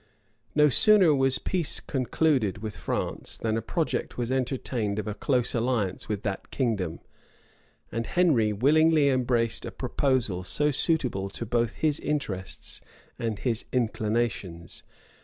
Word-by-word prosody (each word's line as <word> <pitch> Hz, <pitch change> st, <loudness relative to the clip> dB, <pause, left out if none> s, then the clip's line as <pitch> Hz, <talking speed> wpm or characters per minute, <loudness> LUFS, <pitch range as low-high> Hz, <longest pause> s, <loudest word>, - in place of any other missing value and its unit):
[*] -, -, -40 dB
No 150 Hz, 0 st, +6 dB
sooner 190 Hz, -, +6 dB
was 135 Hz, -2 st, +2 dB
peace 175 Hz, -5 st, -1 dB
concluded 130 Hz, -, 0 dB
with 110 Hz, 0 st, -6 dB
France, -, -, -3 dB
than 110 Hz, -1 st, -1 dB
a 115 Hz, -, -1 dB
project 160 Hz, +8 st, -2 dB
was 120 Hz, 0 st, -2 dB
entertained 125 Hz, -5 st, -1 dB
of 105 Hz, -, -2 dB
a 105 Hz, -, -2 dB
close 125 Hz, +3 st, 0 dB
alliance 115 Hz, -5 st, -1 dB
with 105 Hz, -1 st, -2 dB
that 100 Hz, -2 st, -4 dB
kingdom; 105 Hz, -, -1 dB, 0.9 s
and 115 Hz, 0 st, -3 dB
Henry 145 Hz, -12 st, +3 dB
willingly 150 Hz, +6 st, +4 dB
embraced 120 Hz, -3 st, +1 dB
a -, -, -4 dB
proposal 125 Hz, -7 st, 0 dB
so 150 Hz, +10 st, +1 dB
suitable 125 Hz, -10 st, 0 dB, 0.2 s
both 120 Hz, 0 st, +1 dB
to -, -, -20 dB
his 155 Hz, -1 st, +2 dB
interests 105 Hz, -11 st, -4 dB, 0.4 s
and 115 Hz, -3 st, -2 dB
his 120 Hz, 0 st, -2 dB
inclinations. 110 Hz, -7 st, -2 dB
120 Hz, 140 wpm, -27 LUFS, 105-140 Hz, 0.9 s, No